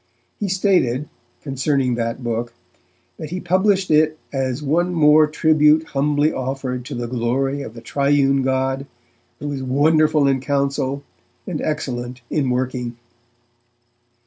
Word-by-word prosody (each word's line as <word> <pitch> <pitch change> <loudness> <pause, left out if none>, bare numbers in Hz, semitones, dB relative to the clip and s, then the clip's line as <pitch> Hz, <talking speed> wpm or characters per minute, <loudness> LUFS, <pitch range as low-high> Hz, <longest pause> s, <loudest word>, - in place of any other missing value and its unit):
He 205 - -1
stated, 180 - +1 0.4
concerning 135 -2 0
that 115 +1 -3
book, 120 0 -3 0.6
that 155 - -7
he 180 +3 -4
published 190 +1 +1
it 155 0 +3 0.2
'as 135 +1 -2
one 175 +5 +1
more 155 -1 +6
tribute 155 0 +4
humbly 145 +2 +1
offered 130 -1 -3
to - - -6
the 120 0 -3
glory 130 +4 -1
of 115 - -8
the 115 - -9
Triune 140 +2 +2
God, 135 +1 -1 0.5
who 145 +3 -5
is 135 -2 -4
wonderful 150 +3 +3
in 135 -1 +2
counsel, 140 0 -1 0.4
and 165 -5 -4
excellent 125 -4 -3
in 140 -4 0
working'. 125 -1 -2
140 Hz, 130 wpm, -20 LUFS, 130-155 Hz, 0.6 s, more